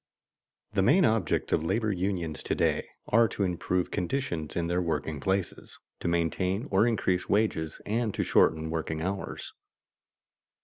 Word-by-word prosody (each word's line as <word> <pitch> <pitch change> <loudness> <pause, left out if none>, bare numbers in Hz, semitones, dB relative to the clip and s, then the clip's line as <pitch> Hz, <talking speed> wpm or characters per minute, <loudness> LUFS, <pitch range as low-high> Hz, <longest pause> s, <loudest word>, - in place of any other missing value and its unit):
_The 95 -2 +2
main 155 - +5
objects 110 - +1
of - - +2
labor 110 +5 0
unions 90 -4 -2
to - - -1
day - - 0 0.2
are 115 +1 +5
to 105 - -2
improve 90 0 -1
conditions 90 - -2
in 85 - 0
their 90 +2 0
working 80 -3 -2
places, 95 +6 -2 0.2
to - - -3
maintain 90 - 0
or 115 - +4
increase 95 -6 0
wages, 90 -7 0
and 110 +1 0
to - - 0
shorten 80 0 +3
working 80 -1 -2
hours. 95 +2 -4
90 Hz, 145 wpm, -28 LUFS, 80-105 Hz, 0.2 s, main